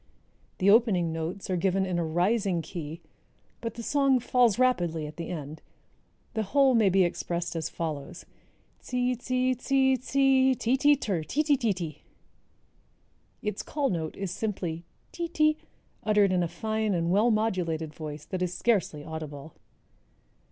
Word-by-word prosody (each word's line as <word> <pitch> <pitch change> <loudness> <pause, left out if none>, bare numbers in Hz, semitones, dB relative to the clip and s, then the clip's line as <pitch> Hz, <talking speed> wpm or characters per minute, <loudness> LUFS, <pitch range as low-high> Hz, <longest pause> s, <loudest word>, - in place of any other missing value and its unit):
The 195 +2 +4
opening 200 -8 +3
notes 165 +4 -4
are - - +1
given 190 +2 +1
in 180 -2 -1
a - - 0
rising 180 +2 +1
key, 160 0 -7 0.6
but 230 -1 -4
the 235 - -6
song 275 -1 +3
falls 245 -3 +3
rapidly 175 -11 +1
at 150 0 -8
the 170 - -5
end. 155 -2 -6 0.7
The 220 - 0
whole 265 +5 +3
may 220 -4 +4
be 190 0 +4
expressed 175 0 -2
as 165 -1 -2
follows: 160 +2 -5 0.6
Tzee, 250 0 0
tzee, 255 +1 0
tzee, 265 +1 +2
tzee, 265 0 +3
ti, 240 +2 +1
ti, 290 +2 +5
ter, 200 - -2
ti 260 - -1
ti 295 -2 +3
ti 235 -5 +1
ti." 165 -5 -7 1.4
Its 210 -1 -2
call 285 -5 -1
note 160 -3 -3
is 195 -3 -3
simply 180 -5 -3 0.3
ti 340 -1 -3
ti 310 -2 +2 0.5
uttered 210 -2 +3
in 180 - +2
a 170 - +1
fine 215 +4 -1
and 170 0 0
well 210 +5 +4
modulated 180 -8 -1
voice 150 -1 -7
that 185 - -4
is 180 -1 0
scarcely 195 -10 0
audible. 155 -1 -7
195 Hz, 160 wpm, -28 LUFS, 165-250 Hz, 1.4 s, ti